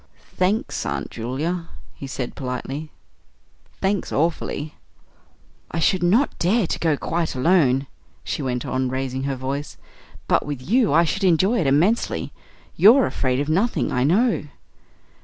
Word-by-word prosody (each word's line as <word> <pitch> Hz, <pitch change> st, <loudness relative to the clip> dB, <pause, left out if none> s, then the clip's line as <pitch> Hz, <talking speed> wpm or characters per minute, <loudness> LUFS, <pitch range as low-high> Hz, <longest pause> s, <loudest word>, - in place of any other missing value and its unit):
"Thanks, 205 Hz, +9 st, 0 dB
Aunt -, -, -3 dB
Julia," 155 Hz, +9 st, -3 dB, 0.2 s
he 140 Hz, -, -8 dB
said 130 Hz, -2 st, -4 dB
politely; 135 Hz, +3 st, -5 dB, 0.9 s
"thanks 195 Hz, 0 st, 0 dB
awfully." 155 Hz, -1 st, -1 dB, 1.0 s
"I -, -, -5 dB
should 175 Hz, +3 st, +2 dB
not 210 Hz, +11 st, +2 dB
dare 205 Hz, +5 st, +2 dB
to -, -, -3 dB
go 160 Hz, -3 st, +1 dB
quite 165 Hz, 0 st, -2 dB
alone," 135 Hz, -2 st, +3 dB, 0.4 s
she -, -, -3 dB
went 125 Hz, -3 st, -2 dB
on, 130 Hz, 0 st, -1 dB
raising 130 Hz, 0 st, -3 dB
her 140 Hz, -1 st, -1 dB
voice; 135 Hz, +3 st, -4 dB, 0.5 s
"but -, -, +3 dB
with 145 Hz, -3 st, -5 dB
you 230 Hz, +2 st, +3 dB
I 165 Hz, +3 st, +5 dB
should 195 Hz, +5 st, -2 dB
enjoy 190 Hz, +6 st, +3 dB
it 160 Hz, -, +1 dB
immensely. 170 Hz, +12 st, +1 dB, 0.4 s
You're 240 Hz, +6 st, +7 dB
afraid 130 Hz, -1 st, -1 dB
of 145 Hz, -, -1 dB
nothing, 195 Hz, +10 st, +1 dB
I 125 Hz, -, +1 dB
know." 205 Hz, -, +2 dB
155 Hz, 140 wpm, -22 LUFS, 135-185 Hz, 1.0 s, You're